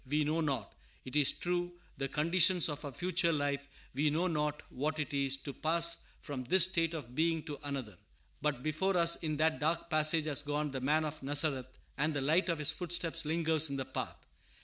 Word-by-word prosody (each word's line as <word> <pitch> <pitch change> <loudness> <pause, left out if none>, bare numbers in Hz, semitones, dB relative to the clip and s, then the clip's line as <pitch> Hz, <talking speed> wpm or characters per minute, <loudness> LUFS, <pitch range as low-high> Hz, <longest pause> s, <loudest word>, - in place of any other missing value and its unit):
We 150 +3 +1
know 155 +3 0
not, 135 -9 -2 0.3
it 130 - -7
is 145 -2 +5
true, 175 0 -2 0.2
the 135 0 -2
conditions 170 +4 +4
of 150 0 -5
our 145 - -5
future 180 +3 +1
life; 145 -2 -1 0.3
we 145 +4 +2
know 160 +5 0
not 150 -4 -1
what 155 +4 -2
it 150 -1 -3
is 135 -1 +1
to 140 - -5
pass 170 +2 +1 0.2
fromm 140 -4 -5
this 185 +5 +5
state 170 -3 +1
of 125 -6 -7
being 165 +2 +1
to 150 -3 -7
another; 135 -8 -4 0.5
but 145 -4 -1
before 180 +5 0
us 170 0 +5
in 155 -2 -3
that 155 +1 +2
dark 165 +2 -1
passage 155 0 +3
has 150 -2 -1
gone 150 0 -2
the 135 -1 -4
Man 155 +4 +2
of 155 0 -5
Nazareth, 135 -2 0 0.2
and 150 +1 +1
the 140 - 0
light 160 +7 +2
of 165 - +1
His 150 -1 +1
footsteps 170 -2 -1
lingers 160 -1 +2
in 140 - -3
the 135 -1 -3
path. - - -5
155 Hz, 205 wpm, -33 LUFS, 145-165 Hz, 0.5 s, is